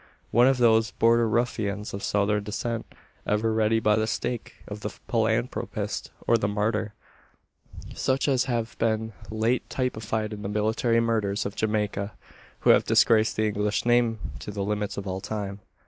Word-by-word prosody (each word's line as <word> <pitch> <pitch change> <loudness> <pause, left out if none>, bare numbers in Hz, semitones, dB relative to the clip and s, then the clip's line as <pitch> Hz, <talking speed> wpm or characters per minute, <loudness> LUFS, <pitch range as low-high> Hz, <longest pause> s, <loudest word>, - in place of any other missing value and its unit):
One 120 +2 +5
of 135 -1 +3
those 115 -2 +4
"border 115 0 +3
ruffians" 105 -3 -1
of 100 - -4
Southern 105 +1 +1
descent, 115 +2 -3 0.4
ever 110 +2 +1
ready 110 0 +2
by 105 -1 +3
the 110 0 +1
stake 120 +1 -3
of 105 0 -6
the 105 - -4
philanthropist, 115 +3 -2 0.2
or 115 - +4
the 100 - 0
martyr 105 0 -1 1.0
such 135 +2 0
as 130 -3 +2
have 120 -2 -2
been 110 0 0 0.2
late 110 +3 0
typified 110 -4 -2
in 105 - -7
the 100 - -4
military 110 +3 +1
murderers 110 -4 0
of 100 - -4
Jamaica, 105 -1 -1 0.5
who - - +6
have - - +5
disgraced 110 -1 +4
the 110 - +1
English 105 +1 0
name 120 -2 +3 0.2
to - - -8
the 100 -1 -3
limits 105 0 -2
of 100 - -4
all 95 0 -3
time. 100 -2 -4
110 Hz, 165 wpm, -26 LUFS, 105-115 Hz, 1.0 s, who